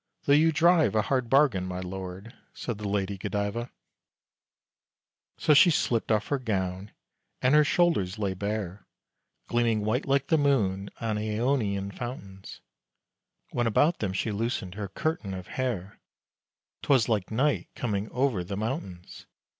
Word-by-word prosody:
Though 140 - +3
you 160 +3 +5
drive 165 -2 +4
a 110 - +3
Hard 130 -1 -1
bargain, 135 -10 +3
my 90 0 -4
lord," 95 +4 -7 0.2
said 115 -4 -5
the 105 - -4
Lady 100 -1 -1
Godiva. 105 +5 -2 1.7
So 150 - +4
she 150 +5 +7
slipped 120 -8 +1
off 105 -1 +1
her 140 - 0
gown, 95 -4 -2 0.5
and 125 +2 +2
her 150 0 +7
shoulders 140 - +1
lay 100 -3 -1
bare, 100 -1 -4 0.6
Gleaming 120 -2 +1
white 125 +7 0
like 140 0 +1
the 160 - +4
moon 100 -9 +1
on 110 -2 -1
Aonian 105 -3 -1
fountains; 100 -5 -8 0.9
When 120 -1 0
about 150 +9 +3
them 100 -3 -1
she 105 +3 -1
loosened 105 -3 -2
her 100 0 -5
curtain 105 - -3
of 90 -1 -7
hair, 110 -7 -4 0.8
'Twas 135 -5 +3
like 105 -5 0
Night 135 +7 0
coming 105 -3 -2
over 125 -7 0
the 95 +2 -5
mountains! 105 - -5
110 Hz, 145 wpm, -27 LUFS, 100-130 Hz, 1.7 s, she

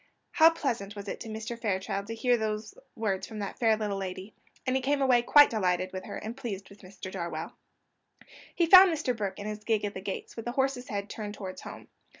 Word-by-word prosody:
How 320 0 +7
pleasant 235 -11 -3
was 200 0 -8
it - - -4
to 225 - -7
Mr. 220 +2 -6
Fairchild 200 -1 -2
to 225 - -4
hear 245 +2 +3
those 215 -1 -3 0.2
words 205 -4 -2
from 220 - -8
that 200 -2 -5
fair 225 -2 +4
little 205 -2 -2
lady! 190 +2 -6 0.3
And 255 0 +1
he 265 - +1
came 280 +2 +1
away 255 -3 +4
quite 290 +4 +7
delighted 185 -4 0
with 185 0 -5
her, - - -6
and 220 +2 -6
pleased 205 -8 -6
with 200 - -15
Mr. 185 0 -9
Darwell. 170 -3 -5 1.0
He 345 - +3
found 370 +2 +9
Mr. 295 -6 -1
Burke 205 -3 -3
in 205 - -7
his 210 0 -5
gig 215 -1 +1
at 205 - -3
the 190 - -6
gates, 195 0 -5
with 230 - -7
the 240 - -3
horse's 265 -1 0
head 200 -1 -3
turned 210 0 -6
towards 190 -2 -7
home. - - -10
215 Hz, 225 wpm, -29 LUFS, 200-245 Hz, 1.0 s, found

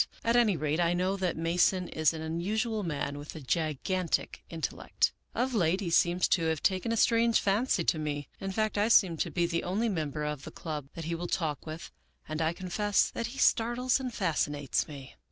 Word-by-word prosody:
At 230 +1 +2
any 225 -7 +4
rate, 155 +2 -1
I 170 0 +3
know 185 +2 +1
that 185 -4 -1
Mason 175 +2 +2
is 155 -1 +2
an 160 -1 -6
unusual 210 +8 -1
man 145 -5 -3
with 145 +2 -9
a - - -6
gigantic 160 +5 -1
intellect. 165 -2 -1 0.2
Of 255 +1 0
late 185 -4 +2
he 180 -5 -3
seems 175 +2 +3
to 165 - +2
have 160 -2 -1
taken 190 +4 +1
a 230 - 0
strange 230 0 +4
fancy 200 -1 +1
to 160 - +1
me. 145 -2 -3
In 195 0 -4
fact, 215 +1 0
I 210 - +3
seem 190 -7 +5
to - - -1
be 175 -1 +1
the 170 -1 -1
only 210 +6 0
member 155 -5 -2
of 150 -2 -3
the - - -7
club 150 -4 -6
that 165 - -6
he 170 - -2
will 175 +1 -3
talk 160 -4 -2
with, 155 +2 -7 0.4
and 155 +1 -3
I 160 0 +2
confess 195 +3 0
that 230 - -3
he 265 - -9
startles 240 +3 +2
and 255 -2 -4
fascinates 150 - 0
me. 140 -3 -10
175 Hz, 210 wpm, -30 LUFS, 155-210 Hz, 0.4 s, seem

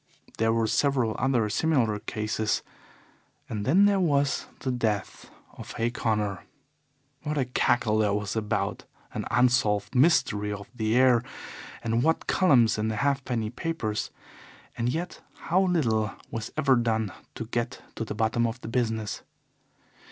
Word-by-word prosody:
There 115 0 +3
were 115 0 +2
several 125 -1 +1
other 125 -4 +2
similar 115 -2 +1
cases, 110 0 -2 0.8
and 105 -2 -4
then 185 +9 +6
there 200 -1 +3
was 145 -5 +1
the 130 - -1
death 110 -6 -2 0.3
of - - -8
Hay 115 +1 -1
Connor. 105 -5 -1 0.8
What 150 0 -3
a 135 - +1
cackle 120 -3 +1
there 105 -2 +2
was 105 +1 -2
about 110 -1 -2 0.3
an - - -3
unsolved 120 -5 +2
mystery 125 -7 +3
of 100 -1 -6
the 110 -2 0
air, 125 -2 +5 0.6
and 115 0 +1
what 160 +4 +1
columns 125 - +4
in 110 - 0
the 110 - -1
halfpenny 125 -4 -1
papers, 120 -8 -3 0.7
and 115 +1 -1
yet 170 +7 -4
how 180 +3 +1
little 120 - +1 0.2
was 115 -1 -4
ever 140 -4 +4
done 110 -4 0 0.2
to - - -5
get - - -3
to - - -4
the - - -5
bottom 115 +1 +1
of 115 +2 -5
the - - -7
business! 110 -3 -1
115 Hz, 145 wpm, -27 LUFS, 110-135 Hz, 0.8 s, then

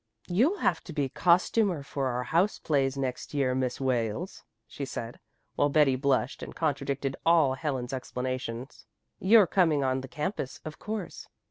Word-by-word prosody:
"You'll 250 - +2
have - - 0
to 170 - -8
be 145 -3 0
costumer 180 - +2
for 140 -1 -2
our 125 0 -1
house 175 - +1
plays 135 -3 0
next 130 +2 -4
year, 135 -3 +2
Miss 130 -1 -1
Wales," 130 - -1 0.2
she 140 - -7
said, 120 -3 -6 0.4
while 145 - +2
Betty 145 -3 +4
blushed 130 -1 0
and - - -8
contradicted 140 -3 -1
all 165 -5 +4
Helen's 135 -3 -3
explanations. 130 0 -5 0.3
"You're 210 +1 +6
coming 165 -6 +2
on 130 0 0
the 135 - -8
campus, 150 -1 -4
of 155 -1 -7
course." 210 -4 -5
140 Hz, 155 wpm, -28 LUFS, 130-165 Hz, 0.4 s, You're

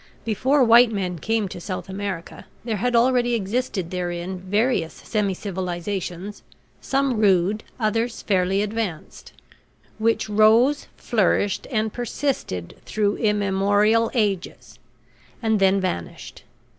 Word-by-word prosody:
Before 260 +6 +2
white 235 0 +6
men 185 -5 -3
came 220 +3 0
to 175 - -8
South 185 +2 -5
America 190 -3 -6 0.2
there 225 -3 -1
had 245 +4 0
already 240 0 +3
existed 205 -4 -2
therein 180 0 -3
various 195 -2 0
semi 205 -4 -2
civilizations, 185 +1 -4 0.4
some 270 -4 0
rude, 200 0 +2 0.2
others 225 +1 -1
fairly 195 0 +1
advanced, 210 -6 -5 0.7
which 225 0 +1
rose, 220 +7 +4
flourished, 205 -2 0
and 220 -4 -1
persisted 240 - -3
through 205 -1 0
immemorial 205 +1 +2
ages, 200 -6 -2 0.6
and 220 -2 +1
then 195 0 +4
vanished. 85 - -5
205 Hz, 110 wpm, -23 LUFS, 190-230 Hz, 0.7 s, white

